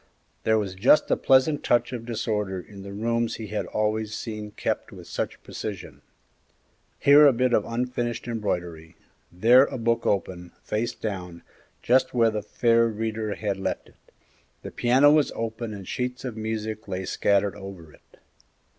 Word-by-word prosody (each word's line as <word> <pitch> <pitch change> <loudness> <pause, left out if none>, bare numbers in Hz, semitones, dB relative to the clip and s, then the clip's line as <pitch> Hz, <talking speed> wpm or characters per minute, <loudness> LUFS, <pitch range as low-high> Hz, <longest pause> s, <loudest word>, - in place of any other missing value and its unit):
There 110 0 +4
was 100 -3 -2
just 115 +10 +4
a - - +5
pleasant 135 +3 +3
touch 120 +1 +2
of 115 -1 -6
disorder 105 -4 -2
in 100 +2 -11
the 100 0 -8
rooms 115 +3 -1
he 110 -2 -7
had 105 0 -3
always 110 0 -1
seen 110 -2 -6
kept 105 - -3
with - - -11
such - - -4
precision: 105 -4 -7 1.0
here 145 +1 +7
a - - +7
bit 125 0 +1
of - - +3
unfinished 120 -1 -2
embroidery; 90 -7 -4 0.4
there 120 +9 +6
a - - -5
book 115 0 0
open, 90 -3 -2
face 120 +3 -2
down, 90 -5 -6 0.4
just 125 +1 +2
where 115 -2 +4
the 105 -1 -3
fair 115 +2 +2
reader 110 -1 -3
had 100 -3 -3
left 95 - -3
it; - - -24 0.7
the - - -7
piano 130 +4 +4
was 150 -1 +3
open 115 0 -4
and 100 -3 -8
sheets 125 +1 -3
of 125 -4 -4
music 110 -1 -4
lay 95 -1 -4
scattered 100 0 +1
over 95 -6 -10
it. - - -23
110 Hz, 165 wpm, -25 LUFS, 100-120 Hz, 1.0 s, here